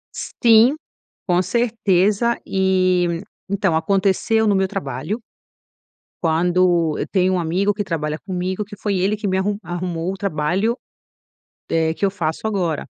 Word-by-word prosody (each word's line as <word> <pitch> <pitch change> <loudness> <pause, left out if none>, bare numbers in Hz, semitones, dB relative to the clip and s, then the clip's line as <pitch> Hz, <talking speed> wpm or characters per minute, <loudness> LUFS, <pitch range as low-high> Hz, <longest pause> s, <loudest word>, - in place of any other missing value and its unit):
Sim, 230 +4 +4 0.5
com 180 -1 +3
certeza, 215 +1 +1
e 185 -3 +1 0.3
então 195 -4 +1
aconteceu 195 +5 +1
no 205 - +3
meu 190 0 +2
trabalho, 145 - -4 1.0
quando, 170 -1 +2
eu - - -2
tenho 185 -1 +2
um 180 - +1
amigo 180 +5 +1
que 205 0 -3
trabalha 155 -4 -3
comigo, 185 +2 -2
que 205 0 -11
foi 200 -1 -1
ele 195 +4 +1
que 210 0 -4
me 190 - +1
arru 200 +2 -1
arrumou 175 0 -3
o - - -6
trabalho, 195 +4 0 0.9
eh, 160 -1 +1
que 200 - -3
eu 195 - +3
faço 170 0 -3
agora, 180 -8 -1
185 Hz, 145 wpm, -20 LUFS, 170-205 Hz, 1.0 s, Sim